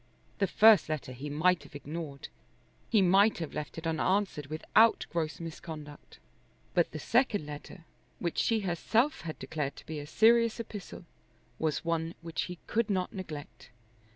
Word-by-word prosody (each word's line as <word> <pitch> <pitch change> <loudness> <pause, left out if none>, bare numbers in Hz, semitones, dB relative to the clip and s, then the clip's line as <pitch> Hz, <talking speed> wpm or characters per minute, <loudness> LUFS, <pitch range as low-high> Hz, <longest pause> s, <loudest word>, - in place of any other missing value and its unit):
The 195 - +3
first 215 -7 +6
letter 155 -4 -3
he 130 +4 -6
might 170 +5 +2
have - - -15
ignored. 145 0 -6 0.6
He 215 -4 +4
might 195 +4 +5
have 165 -3 -5
left 150 - -5
it 165 - -6
unanswered 165 -1 0
without 215 +9 +3
gross 160 -3 -2
misconduct. 155 -3 -9 0.6
But 175 - +3
the - - -7
second 220 - +1
letter, 150 +4 -9 0.3
which 170 -2 -2
she 225 -2 +2
herself 220 - +1
had 155 -1 -6
declared 150 -3 -3
to - - -13
be 155 -1 -5
a 145 - -7
serious 230 +5 +4
epistle, 205 -5 -7 0.5
was 155 0 -1
one 165 0 -1
which 165 -1 -2
he 180 -1 -7
could 230 0 0
not 185 -2 -1
neglect. 160 -7 -8
165 Hz, 155 wpm, -30 LUFS, 155-205 Hz, 0.6 s, first